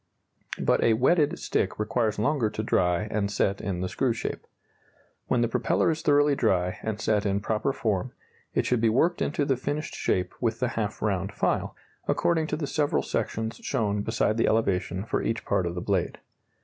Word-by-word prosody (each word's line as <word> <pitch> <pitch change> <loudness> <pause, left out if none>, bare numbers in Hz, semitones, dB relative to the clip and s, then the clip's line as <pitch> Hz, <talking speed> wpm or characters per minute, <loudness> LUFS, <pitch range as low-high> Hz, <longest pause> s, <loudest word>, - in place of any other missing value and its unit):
But - - +2
a 115 - +5
wetted 145 +6 +3
stick - - -1
requires 110 0 0
longer 120 0 +1
to 110 - -4
dry 90 -3 +2
and 100 -1 0
set 100 -1 0
in 90 -3 -3
the 95 - -1
screw 120 +6 0
shape. 115 - -5 0.8
When 120 - +2
the 120 - +3
propeller 120 +6 +1
is 160 - -3
thoroughly 145 0 +4
dry 90 -6 +1
and 110 -1 -3
set 105 -2 +1
in 100 -1 +1
proper 110 +5 0
form, 110 -2 -1 0.4
it - - +2
should 125 -3 +1
be 115 - +4
worked 160 +10 +2
into 145 0 0
the 135 - +2
finished 145 +4 -3
shape 90 - -1
with 115 -2 0
the 125 - +1
half 110 -3 -3
round 100 -2 0
file, - - -1 0.3
according 160 -2 +1
to - - -1
the 155 - -2
several 145 0 0
sections 110 0 -2
shown 105 -6 -1
beside 110 0 0
the 115 - +2
elevation 100 -3 0
for - - -1
each 115 0 -2
part 95 -3 +1
of 85 - -4
the 90 - -3
blade. 95 -2 -1
110 Hz, 190 wpm, -27 LUFS, 100-130 Hz, 0.8 s, a